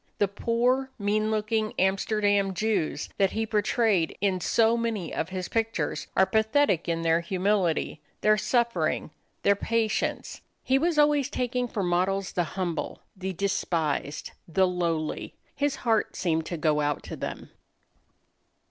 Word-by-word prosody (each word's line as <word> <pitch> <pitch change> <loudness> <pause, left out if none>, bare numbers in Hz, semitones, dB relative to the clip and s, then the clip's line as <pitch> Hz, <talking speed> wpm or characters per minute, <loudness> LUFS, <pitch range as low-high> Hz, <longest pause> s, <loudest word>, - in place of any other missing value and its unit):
The 205 - +3
poor, 240 +6 +1
mean 215 0 0
looking 215 0 0
Amsterdam 200 0 +1
Jews 190 -7 -1
that 195 -1 +3
he 225 0 0
portrayed 210 -4 +1
in 190 -2 0
so 225 +5 +3
many 230 -7 -2
of 160 - -2
his 185 -1 -4
pictures 225 0 -1
are 190 - +6
pathetic 220 - +2
in 165 0 -1
their 165 0 +3
humility, 185 0 0 0.2
their 215 0 +5
suffering, 235 +2 0 0.3
their 200 - +5
patience. 225 +1 -1 0.2
He 265 +1 +3
was 335 +1 +1
always 295 -2 +4
taking 250 -2 -1
for 210 -4 -3
models 185 +2 0
the 175 - 0
humble, 175 -3 -3
the 190 0 -4
despised, 165 -6 -1 0.2
the 185 +3 +3
lowly. 170 -4 -2 0.2
His 285 0 0
heart 225 -2 +1
seemed 160 -3 0
to 170 - -3
go 155 -1 +2
out 145 -1 -1
to - - -6
them. - - -6
200 Hz, 140 wpm, -27 LUFS, 180-225 Hz, 0.3 s, are